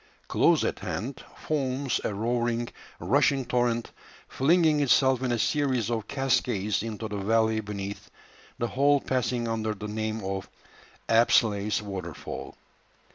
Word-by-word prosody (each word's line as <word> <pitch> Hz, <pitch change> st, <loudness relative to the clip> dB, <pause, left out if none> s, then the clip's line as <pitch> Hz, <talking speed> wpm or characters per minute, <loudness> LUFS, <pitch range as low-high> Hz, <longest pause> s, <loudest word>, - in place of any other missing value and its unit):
Close -, -, +3 dB
at -, -, -1 dB
hand 125 Hz, +4 st, -5 dB
foams 135 Hz, -3 st, -1 dB
a -, -, -1 dB
roaring, 120 Hz, +2 st, -1 dB, 0.3 s
rushing 135 Hz, -2 st, +2 dB
torrent, 120 Hz, -1 st, 0 dB, 0.4 s
flinging 155 Hz, +1 st, +3 dB
itself 130 Hz, -2 st, +3 dB
in 130 Hz, -2 st, 0 dB
a 120 Hz, -, +1 dB
series 130 Hz, -3 st, +1 dB
of 110 Hz, -2 st, -2 dB
cascades 125 Hz, -6 st, 0 dB
into 110 Hz, 0 st, -4 dB
the 105 Hz, -1 st, -4 dB
valley 110 Hz, +2 st, +2 dB
beneath, 100 Hz, -1 st, -6 dB, 0.5 s
the 120 Hz, -, -1 dB
whole 140 Hz, +2 st, +3 dB
passing 125 Hz, -3 st, -1 dB
under 110 Hz, -1 st, -1 dB
the 105 Hz, +1 st, -6 dB
name 110 Hz, 0 st, -3 dB
of 95 Hz, 0 st, -4 dB, 0.6 s
"Apsley's 105 Hz, -2 st, +3 dB
Waterfall." 100 Hz, -2 st, -6 dB
115 Hz, 130 wpm, -27 LUFS, 105-130 Hz, 0.6 s, Close